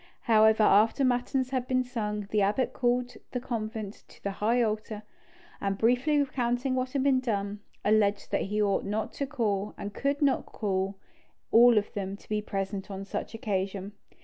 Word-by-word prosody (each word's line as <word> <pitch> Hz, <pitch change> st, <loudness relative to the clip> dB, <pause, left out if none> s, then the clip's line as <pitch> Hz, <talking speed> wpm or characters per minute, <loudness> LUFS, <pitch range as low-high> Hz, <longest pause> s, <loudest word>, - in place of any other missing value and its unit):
However, 220 Hz, -1 st, +5 dB
after 220 Hz, +6 st, +4 dB
matins 255 Hz, +1 st, 0 dB
had 255 Hz, -2 st, -1 dB
been 255 Hz, 0 st, +2 dB
sung, 210 Hz, -5 st, -3 dB
the 210 Hz, -, +2 dB
abbot 205 Hz, +6 st, +1 dB
called 245 Hz, 0 st, 0 dB, 0.2 s
the 250 Hz, -, -1 dB
convent 220 Hz, -4 st, -5 dB
to -, -, -19 dB
the 200 Hz, -, -1 dB
high 220 Hz, +5 st, +1 dB
altar, 215 Hz, -1 st, -3 dB, 0.6 s
and 195 Hz, -1 st, -1 dB
briefly 250 Hz, +7 st, +2 dB
recounting 255 Hz, -2 st, 0 dB
what 255 Hz, 0 st, -2 dB
had 275 Hz, -2 st, +1 dB
been 270 Hz, -2 st, +4 dB
done, 205 Hz, -4 st, -2 dB, 0.3 s
alleged 205 Hz, -1 st, +2 dB
that -, -, +1 dB
he 210 Hz, +1 st, -1 dB
ought 205 Hz, -2 st, +2 dB
not 210 Hz, +2 st, -3 dB
to 280 Hz, -, -3 dB
call—and 210 Hz, -5 st, -2 dB
could 280 Hz, +6 st, -1 dB
not 275 Hz, -2 st, +2 dB
call—all 205 Hz, +4 st, +1 dB
of 210 Hz, -, 0 dB
them 200 Hz, -2 st, -4 dB
to -, -, -20 dB
be 210 Hz, 0 st, -1 dB
present 195 Hz, -1 st, -4 dB
on 195 Hz, 0 st, -6 dB
such 205 Hz, -, -5 dB
an 225 Hz, -, -9 dB
occasion. 195 Hz, -1 st, -2 dB
220 Hz, 175 wpm, -28 LUFS, 200-250 Hz, 0.6 s, However